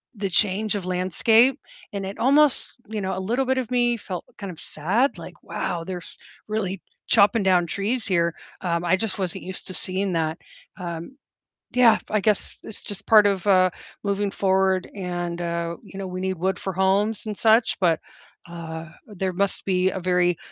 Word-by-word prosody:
the 200 -1 -2
change 205 +3 +2
of 195 -3 -3
landscape, 190 +8 +3 0.3
and 195 -1 -3
it 195 - -6
almost 280 +4 +3
you 215 -1 -4
know, 190 -1 -2
a - - -2
little 240 +7 0
bit 260 +1 +1
of 250 -1 -4
me 240 -1 +2
felt 185 -4 -6
kind 200 -2 -6
of 165 - -12
sad, 205 - 0
like, - - -10
"Wow, 170 -1 -3
they're 185 0 -4
s - - -12 0.3
really 195 -4 -2 0.3
chopping 210 +1 +5
down 180 -2 +4
trees 220 +6 -1
here," 170 -3 +1 0.3
um, 170 -1 -1
I 175 +2 +4
just 210 -1 -3
wasn't 185 -3 -3
used 185 0 -7
to 185 - -7
seeing 190 +2 -2
that. 160 -1 0 0.4
Um, 170 - -6 0.6
yeah, 245 -3 +6
I 215 - +2
guess 210 -1 0
it's 220 - -10
just 200 -1 -7
part 210 -2 +7
of, 195 -1 0
uh, 185 -2 +5 0.3
moving 200 0 0
forward 190 -1 +1
and, 175 -2 -3
uh, 170 0 -2
you 195 - -10
know, 195 - -4
we 185 0 -5
need 190 -1 -1
wood 190 0 0
for 190 - -4
homes 200 +4 +1
and 210 - -4
such, 225 +1 +4
but, 170 -4 +3 0.5
uh, 165 -1 -7 0.2
there 190 -3 -3
must 200 +2 -1
be 185 -1 +2
a 190 - -4
very, 180 -1 +2
190 Hz, 185 wpm, -24 LUFS, 180-210 Hz, 0.6 s, part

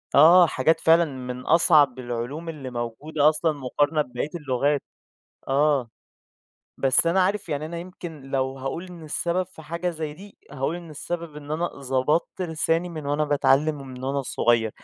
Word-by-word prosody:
آه، 170 +5 +8
حاجات 160 +3 +2
فعلًا 165 +1 +5
من 125 -3 -6
أصعب 150 -6 +5
العلوم 125 +7 -4
اللي 145 -5 -6
موجودة 130 +6 0
أصلًا 155 +1 +1
مقارنة 145 +2 0
بباقيّة 125 +1 -4
اللغات 145 -1 0 0.7
آه، 140 -3 +2 0.9
بس 135 +4 +4
أنا 185 +3 +3
عارف 200 0 -1
يعني 150 0 -2
أنا 170 +1 -6
يمكن 175 -4 -9
لو 135 0 -2
هاقول 135 +7 -4
إن 175 -2 -11
السبب 170 +4 -1
في 165 -3 -14
حاجة 170 +3 -3
زي 155 -2 -5
دي، 200 +5 -14
هاقول 145 +4 -2
إن 170 -2 -10
السبب 165 +1 -5
إن 145 0 -10
أنا 165 +3 0
ضبطت 140 +6 -1
لساني 165 +1 0
من 155 -4 -7
وأنا 145 +1 +1
باتعلّم 145 +1 +2
ومن 130 -1 -8
وأنا 140 +1 -1
صغيّر، 115 -3 +1
150 Hz, 160 wpm, -24 LUFS, 135-165 Hz, 0.9 s, آه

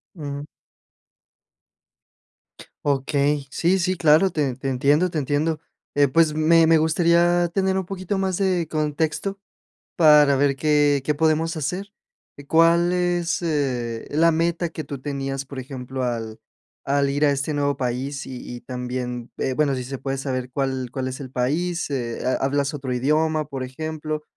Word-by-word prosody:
Ujú. 145 -2 -6 2.4
Okey, 140 +1 +1
sí, 175 +7 +1
sí, 185 +1 0
claro, 160 +4 +5
te 145 -6 -1
te 135 0 -3
entiendo, 145 +7 +2
te 165 - -4
entiendo. 150 +3 0 0.4
Eh, 145 -1 +5
pues, 155 +2 +3
me 160 +1 +5
me 165 0 +6
gustaría 170 +2 +3
tener 190 0 +1
un 185 - -4
poquito 195 0 -3
más 190 -2 0
de 185 -5 +1
contexto, 155 +6 -1 0.6
para 150 -4 +6
ver 140 0 +2
qué 145 -1 +2
qué 150 - +2
podemos 160 +2 +1
hacer, 180 +7 -3 0.4
eh, 145 0 -12
¿cuál 170 +2 +4
es, 175 -1 0
eh, 125 -8 -2
la 165 +3 +4
meta 170 +1 0
que 160 -2 -7
tú 140 -1 -7
tenías?, 135 -1 -3
por 140 -1 -9
ejemplo, 130 0 -5
al 115 -2 -3 0.5
al 140 0 +1
ir 145 +2 +1
a 145 - +4
este 140 +2 -2
nuevo 145 -1 0
país 130 +2 -3
y 130 -1 -7 0.2
y 120 - -8
también, 125 -1 -5
eh, 130 - -1
bueno, 145 -2 +1
si 130 - -3
se 135 +1 -6
puede 135 0 -3
saber, 130 -2 -4
¿cuál 130 -2 -2
cuál 130 -1 -3
es 130 - -6
el 130 -2 -9
país?, 160 +7 -1
eh, 120 -4 -3
¿ha 130 - +1
hablas 140 +2 0
otro 135 -3 -4
idioma?, 155 +3 +1
por 135 -2 -4
ejemplo, 155 +3 -5
145 Hz, 165 wpm, -23 LUFS, 135-165 Hz, 2.4 s, me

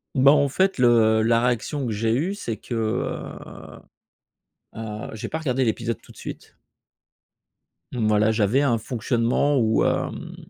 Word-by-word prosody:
Bah, 135 +1 +6
en 145 -1 +4
fait, 190 +8 +1
le 115 -3 +4
la 115 +1 +3
réaction 125 +4 -1
que 115 - -2
j'ai 110 +2 0
eue, 165 +11 -1
c'est 115 - -4
que, 120 - -9
heu 110 -2 -5 0.9
heu, 110 -1 -6
j'ai 110 - -6
pas 160 - -3
regardé 135 -4 0
l'épisode 115 -1 -2
tout - - -17
de - - -18
suite. - - -9 1.3
Mmh, 115 -4 -1
voilà, 110 +1 +3
j'avais 110 +5 +2
un 125 -5 +2
fonctionnement 120 +4 0
où, 110 -2 +2
hem, - - -2
115 Hz, 155 wpm, -23 LUFS, 110-135 Hz, 1.3 s, Bah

